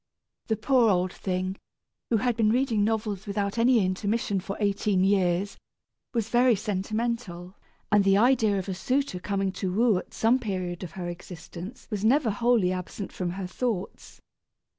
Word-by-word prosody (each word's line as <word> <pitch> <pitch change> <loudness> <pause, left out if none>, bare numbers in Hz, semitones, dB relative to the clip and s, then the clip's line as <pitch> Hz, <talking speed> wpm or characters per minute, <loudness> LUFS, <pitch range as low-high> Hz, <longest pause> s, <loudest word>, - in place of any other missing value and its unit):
The 220 - +1
poor 245 0 +3
old 185 -1 +1
thing, 185 0 -3 0.5
who 230 - +3
had 240 +2 0
been 220 -2 +3
reading 235 -3 +2
novels 215 -2 -1
without 200 +2 -2
any 235 -3 +4
intermission 200 +2 -1
for 195 +2 -6
eighteen 200 -2 +1
years, 190 0 +1 0.5
was 225 -3 -1
very 245 0 +4
sentimental, 205 -2 -3 0.4
and 205 -1 +5
the 195 0 +4
idea 225 -3 +3
of 190 - -3
a 190 - -2
suitor 250 +2 -1
coming 195 0 -1
to 185 0 -3
woo 215 0 +3
at - - -12
some 235 +4 +3
period 185 -6 -3
of 170 -3 -7
her 180 -2 -5
existence 175 +4 -9
was 210 -1 -2
never 245 +1 +3
wholly 220 -3 +2
absent 185 +2 -5
from 180 -2 -3
her 185 +2 -4
thoughts. 205 0 -4
200 Hz, 160 wpm, -27 LUFS, 185-230 Hz, 0.5 s, and